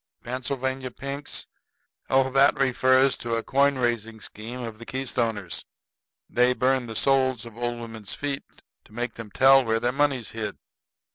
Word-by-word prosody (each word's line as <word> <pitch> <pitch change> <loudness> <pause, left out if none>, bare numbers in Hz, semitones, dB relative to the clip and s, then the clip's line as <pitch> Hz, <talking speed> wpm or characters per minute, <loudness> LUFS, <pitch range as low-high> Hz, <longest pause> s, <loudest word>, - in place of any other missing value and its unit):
"Pennsylvania 130 +1 -3
pinks? 140 +3 -5 0.6
Oh, 135 0 +3
that 135 +2 +5
refers 130 0 +3
to 115 -1 -2
a 115 - -2
coin 140 0 +3
raising 115 -3 -1
scheme 115 +4 -8
of 115 -2 -6
the 115 - -9
Keystoners. 115 -8 -2 0.6
They 125 +1 +3
burn 130 -1 +1
the 110 - -7
soles 130 -2 +2
of 115 -2 -11
old 120 0 -2
women's 110 -3 -6
feet 140 -1 -3 0.4
to - - -20
make 120 +1 -3
them 115 -2 -8
tell 135 +4 +6
where 115 -1 +1
their 120 +1 +1
money's 135 -4 0
hid." 110 -2 -4
125 Hz, 155 wpm, -26 LUFS, 115-135 Hz, 0.6 s, tell